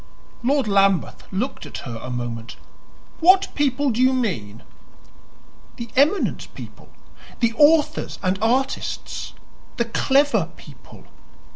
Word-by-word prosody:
Lord 270 0 +1
Lambeth 195 -2 +1
looked 195 - -3
at - - -8
her 120 -3 -6
a 130 - -7
moment. 120 -2 -5 0.6
"What 375 +3 +5
people 280 -1 +1
do 235 +2 -1
you 260 +1 +4
mean?" 115 - -3 1.1
"The 235 -1 -7
eminent 295 +9 +1
people - - -11 0.5
the 235 -2 +2
authors 300 +4 +3
and 185 +1 0
artists 255 +4 -1 0.4
the 235 - +1
clever 275 +5 +2
people." - - -15
235 Hz, 115 wpm, -22 LUFS, 185-280 Hz, 1.1 s, What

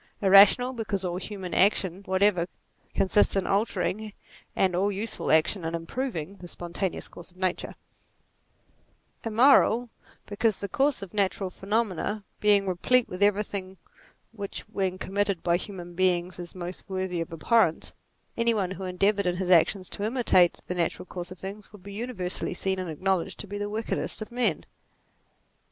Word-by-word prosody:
Irrational, 200 +6 +6
because 205 -5 -3
all 175 0 -2
human 190 -2 -6
action 190 -1 +2
whatever, 190 -2 +2 0.5
con 195 - +2
sists 205 +2 +3
in 195 -2 +1
altering, 210 0 -1 0.4
and 185 -2 +2
all 195 +3 +2
useful 210 +3 -3
action 160 +4 +3
in 165 +1 -2
improving, 185 - -4
the 180 - -10
spontaneous 175 +2 -4
course 175 - -11
of 180 - -22
nature: 185 -1 -1
NATURE - - -13 1.4
65 225 - -6
Immoral, 245 0 +5 0.4
because 210 0 0
the 200 - -4
course 270 +3 +1
of 195 - -9
natural 195 -2 0
phenomena 205 0 -1 0.2
being 205 -1 +4
replete 225 +7 +3
with 180 +2 -7
everything 200 -2 0 0.5
which 205 -3 -6
when 190 -1 -2
committed 200 -1 -1
byTrornan 175 0 -2
beings 180 -1 +1
is 175 0 -8
most 180 +1 -7
worthy 185 -2 -2
of 165 - -5
abhorrence, 165 +1 +1 0.4
any 230 0 +2
one 190 -3 -1
who 190 +1 -6
endeavoured 195 +2 +1
in 175 0 0
his 185 -1 -1
actions 185 +2 +4
to - - -7
imitate 215 -6 +3
the - - -3
natural 175 0 -1
course 175 -1 -6
of 185 - -9
things 200 +3 -8
would 205 -4 -14
be 200 - -9
universally 200 -6 -3
seen 190 +1 -1
and 185 -2 -4
acknowledged 185 +3 -1
to - - -5
be 205 +1 -6
the 205 0 -3
wickedest 220 +2 -3
of 215 +2 -7
men. 235 -9 0
195 Hz, 165 wpm, -27 LUFS, 180-210 Hz, 1.4 s, Irrational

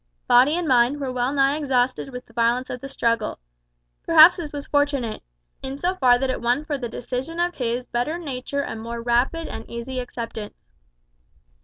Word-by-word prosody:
Body 260 +6 +5
and 350 -2 -2
mind 255 +2 +3
were 270 -2 -3
well 250 +1 0
nigh 275 0 +2
exhausted 260 -2 0
with 250 -1 -8
the 230 - -21
violence 240 +2 +1
of 250 - -6
the 275 - -6
struggle. 230 -4 -1 0.7
Perhaps 330 +2 +8
this 320 -4 -6
was 285 0 -6
fortunate, 285 -6 0 0.4
in 265 +1 -5
so 355 +5 0
far 255 -8 +4
that 265 +1 -1
it - - -4
won 245 +5 +1
for 300 -2 -2
the 245 -4 -4
decision 255 +8 -5
of 350 0 +1
his 245 -2 -2
better 245 +8 -2
nature 280 -3 -4
a - - -5
more 230 +1 -6
rapid 245 +8 +1
and - - -8
easy 240 +2 -5
acceptance. 230 -4 -6
255 Hz, 185 wpm, -23 LUFS, 240-285 Hz, 0.7 s, Perhaps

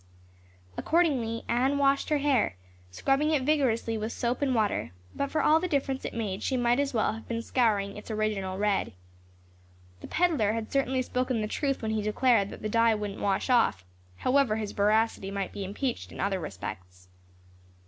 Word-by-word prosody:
Accordingly, 265 -9 +1
Anne 260 +4 +1
washed 275 0 +2
her 300 - +3
hair, 275 - +1 0.3
scrubbing 275 - +1
it 300 -4 +1
vigorously 245 -6 +1
with 215 +2 -3
soap 245 +3 -2
and 265 -3 +1
water, 205 - 0 0.2
but 280 - -1
for 315 - 0
all 315 +1 +5
the 365 - -2
difference 275 -4 -1
it - - -5
made 205 -4 -3
she 260 - 0
might 245 +1 +2
as 285 -1 0
well 220 -2 +1
have 225 - -10
been 230 0 -3
scouring 210 -6 +1
its 210 - -10
original 210 -3 -2
red. 205 -1 0 1.1
The - - -9
peddler 310 - +2
had 225 -1 -4
certainly 265 -1 +1
spoken 250 -2 -1
the 210 - -1
truth 275 +2 -2
when 220 - -1
he 220 -1 0
declared 215 -1 +2
that - - -10
the - - 0
dye 230 +1 +3
wouldn't 210 -1 -5
wash 195 -1 0
off, 235 - +2 0.3
however 255 - +2
his 215 -2 -3
veracity 210 -1 +1
might 195 -1 -3
be 200 - -5
impeached 230 +6 -3
in - - -10
other 195 -1 0
respects. 90 - -8
230 Hz, 180 wpm, -28 LUFS, 210-270 Hz, 1.1 s, all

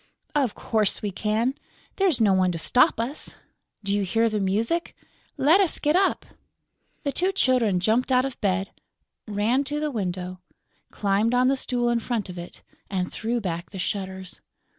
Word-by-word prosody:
"Of 270 -7 +1
course 215 -2 0
we 205 - -1
can; 220 +6 0 0.4
there's 375 -9 +3
no 210 -4 +4
one 185 -1 +3
to - - -3
stop 250 - +3
us.... 245 +6 -4 0.5
Do 200 0 0
you 205 - +1
hear 225 +4 +2
the 215 -1 -1
music?... 220 - 0 0.4
Let 320 +8 +5
us 370 - +1
get 300 +2 +1
up." 385 +1 +2 0.8
The 285 - 0
two 370 +6 +1
Children 250 - +2
jumped 225 +8 +1
out 255 0 +4
of 270 -2 -6
bed, 195 -1 0 0.6
ran 215 +6 +1
to 295 +2 -2
the 300 -1 -1
window, 185 -4 -3 0.5
climbed 210 +4 +1
on 250 +1 +4
the 275 - +3
stool 245 -2 0
in 235 - +2
front 225 -4 -3
of 180 -1 -7
it 175 - -10 0.3
and 185 -2 -2
threw 235 +2 -1
back 170 -4 -4
the 195 - -9
shutters. 190 -1 -4
225 Hz, 175 wpm, -25 LUFS, 195-260 Hz, 0.8 s, Let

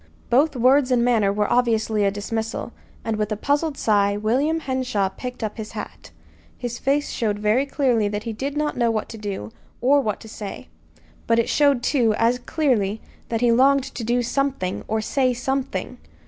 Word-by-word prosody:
Both 280 +4 +3
words 255 +2 +4
and 245 -2 +3
manner 220 -5 +3
were 210 0 0
obviously 220 -3 +2
a 200 - +4
dismissal; 220 +3 -4 0.3
and 225 -1 -1
with 210 0 -2
a 215 - -1
puzzled 285 +4 0
sigh 205 -2 +2
William 270 +10 +1
Henshaw 255 -8 -1
picked 250 +4 -7
up 215 0 -3
his 220 -1 -7
hat. - - -8 0.5
His 240 -1 -5
face 285 +2 0
showed 210 -3 -1
very 215 +6 +1
clearly 250 -7 +1
that 205 +1 -3
he 230 -1 -4
did 275 +6 -4
not 300 0 0
know 235 -2 +2
what 220 -2 -2
to 225 - -8
do, 195 - -5 0.3
or 280 +4 +4
what 210 -5 -2
to - - -11
say; 210 -2 -8 0.6
but 230 - +3
it 230 - +1
showed, 280 -4 +3
too, 235 -7 +2
as 235 +2 +2
clearly, 240 -8 0 0.3
that 230 -1 -1
he 240 -1 +4
longed 270 +3 +4
to 240 - -5
do 240 +2 +1
something, 255 -7 -1
or 220 0 0
say 255 +2 +1
something. 255 -6 -3
235 Hz, 190 wpm, -23 LUFS, 215-265 Hz, 0.6 s, words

